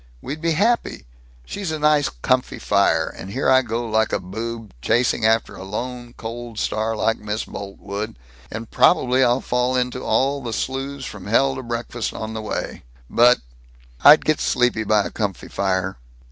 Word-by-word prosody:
We'd 145 - -6
be 165 0 +1
happy. 215 - +1 0.4
She's 195 - -4
a 155 - -2
nice 150 -1 +3
comfy 125 - 0
fire, - - +2
and 95 - -8
here 130 +8 -1
I 130 0 +6
go 120 -1 -3
like 110 0 +1
a - - 0
boob, 110 +3 -6
chasing 120 - +2
after 110 0 +1
a - - -8
lone, 120 +4 -5
cold 115 0 -7
star 110 +1 -1
like 115 +1 0
Miss 105 +1 -3
Boltwood, 100 - -6 0.4
and 115 +1 -6
probably 130 -6 +4
I'll 125 +1 +3
fall 125 +1 0
into 125 0 -1
all 140 +1 +1
the 120 -3 -4
slews 135 +3 -3
from 100 -2 -8
hell 135 +5 +3
to 130 - -5
breakfast 120 -1 -4
on 110 0 -5
the 110 - -4
way. 110 - -4 0.3
But 120 +1 +5 0.6
I'd 150 +2 +8
get 155 - +2
sleepy 125 -3 +1
by 105 -1 +3
a - - -5
comfy 100 -4 -3
fire." 95 -1 -1
120 Hz, 175 wpm, -22 LUFS, 110-130 Hz, 0.6 s, I'd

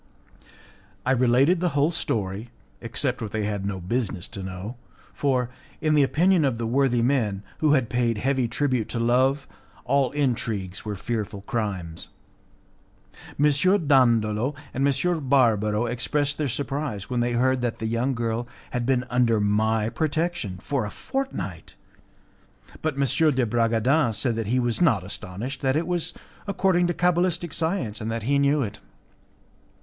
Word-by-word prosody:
I 130 - +2
related 130 +7 +4
the 170 -5 -1
whole 145 +4 +3
story, 105 - -3 0.3
except 125 +2 -2
what 110 -3 -4
they 110 -1 -1
had 100 -1 -2
no 95 -1 -3
business 100 -1 -2
to 100 - -6
know, 95 +5 -6 0.4
for, 125 -4 0 0.3
in 155 -1 +1
the 150 - +5
opinion 170 +5 +3
of 130 -5 +1
the 115 - -3
worthy 120 0 +2
men, 110 -7 +1 0.2
who 155 -2 +4
had 130 -5 +2
paid 120 -2 0
heavy 130 +2 +1
tribute 125 -1 0
to 120 - -2
Love, 130 +4 +2 0.4
all 135 0 +2
intrigues 110 -9 -2
were 105 -1 -4
fearful 105 -1 -4
crimes. 95 -7 -4 1.3
M. 145 - +4 0.4
Dandolo 120 -1 +3 0.2
and 135 +2 +1
M. 140 +1 0
Barbaro 110 -4 +3
expressed 145 +5 -1
their 150 - +1
surprise 135 -5 -3
when 125 -1 -1
they 120 0 +1
heard 130 +1 +2
that 120 -2 -1
the 110 - -4
young 120 +4 0
girl 115 0 -2 0.2
had 120 -1 -2
been 130 -1 +2
under 120 -3 +2
my 110 +1 +1
protection 155 - -1
for 140 +2 -1
a 105 - -3
fortnight, 270 - -5 1.1
but 155 -3 -1
M. 140 - -1 0.3
de 125 -1 +2
Bragadin 115 +4 +2
said 115 +2 -1
that 115 -2 -3
he 125 +4 +2
was 120 +2 0
not 120 - +3
astonished, 105 +7 -5
that 130 +1 +2
it 165 - 0
was 175 -1 -2 0.3
according 190 -3 +2
to 175 - 0
cabalistic 175 -2 +1
science, 160 - -1
and 110 - -3
that 115 -1 -3
he 140 +4 +2
knew 140 0 +3
it. 100 - -6
125 Hz, 155 wpm, -25 LUFS, 110-140 Hz, 1.3 s, the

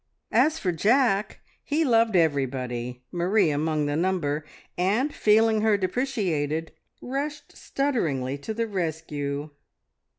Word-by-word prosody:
As 315 +1 +3
for 185 - -1
Jack, 210 - +2 0.2
he 310 +2 0
loved 230 -4 +3
everybody, 125 -6 0
Marie 180 0 +2
among 150 +1 0
the 145 0 -1
number, 160 -4 0 0.3
and, 215 +11 +1
feeling 220 0 +3
her 215 -1 +3
depreciated, 185 - -1 0.3
rushed 290 +3 -4
stutteringly 145 - -1
to 180 - -5
the 230 +1 0
rescue. 155 -6 -3
180 Hz, 110 wpm, -26 LUFS, 145-225 Hz, 0.3 s, As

